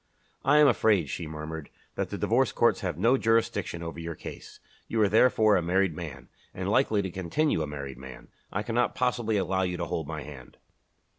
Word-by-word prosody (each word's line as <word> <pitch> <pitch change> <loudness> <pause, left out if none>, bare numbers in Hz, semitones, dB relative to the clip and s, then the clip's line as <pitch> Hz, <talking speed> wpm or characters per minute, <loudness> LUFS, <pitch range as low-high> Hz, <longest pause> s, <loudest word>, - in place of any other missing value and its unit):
"I 145 +2 +4
am 150 -1 +7
afraid," 105 - +3
she 85 - -4
murmured, 80 0 -7 0.2
"that - - -3
the - - -4
Divorce - - +2
Courts - - +2
have - - -3
no 115 +8 +4
jurisdiction 115 -6 0
over 85 0 -6
your 85 0 -5
case. - - -10 0.3
You 115 - -1
are - - +5
therefore 110 0 +4
a - - +2
married 90 0 +1
man, 70 -7 -8 0.3
and - - -4
likely 105 -2 +2
to 95 - -4
continue 95 - 0
a 75 - -2
married 70 -3 -7
man. 65 -1 -11 0.2
I 105 - -2
cannot 120 +2 0
possibly 120 -3 0
allow 95 -1 0
you 90 -1 -1
to 85 - -2
hold 80 -2 -3
my 80 -2 -5
hand." 70 -4 -12
90 Hz, 200 wpm, -28 LUFS, 80-110 Hz, 0.3 s, am